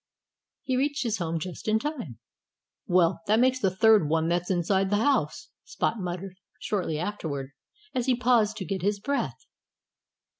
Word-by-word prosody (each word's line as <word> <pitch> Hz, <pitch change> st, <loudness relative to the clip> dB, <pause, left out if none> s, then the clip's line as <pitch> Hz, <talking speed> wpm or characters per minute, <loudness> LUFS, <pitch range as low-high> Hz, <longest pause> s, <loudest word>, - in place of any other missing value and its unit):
He 260 Hz, -, -1 dB
reached 285 Hz, +2 st, 0 dB
his 225 Hz, -3 st, -1 dB
home 165 Hz, -1 st, -1 dB
just 175 Hz, +5 st, -6 dB
in 215 Hz, 0 st, +3 dB
time. 240 Hz, -, -5 dB, 0.7 s
"Well, 175 Hz, -1 st, +3 dB
that 215 Hz, +2 st, +4 dB
makes 255 Hz, +1 st, +3 dB
the 195 Hz, -, +2 dB
third 210 Hz, -4 st, +4 dB
one 160 Hz, +1 st, +1 dB
that's 175 Hz, 0 st, 0 dB
inside 190 Hz, +1 st, +1 dB
the 205 Hz, -, +2 dB
house," 250 Hz, -, +1 dB
Spot 230 Hz, -, -2 dB
muttered, 185 Hz, +1 st, -5 dB, 0.2 s
shortly 180 Hz, -7 st, -2 dB
afterward, 155 Hz, -7 st, -4 dB, 0.4 s
as 250 Hz, -2 st, -1 dB
he 255 Hz, -, +4 dB
paused 235 Hz, -3 st, +2 dB
to 190 Hz, -, -4 dB
get 190 Hz, 0 st, -3 dB
his 200 Hz, +2 st, 0 dB
breath. 280 Hz, +6 st, -3 dB
200 Hz, 160 wpm, -27 LUFS, 175-235 Hz, 0.7 s, that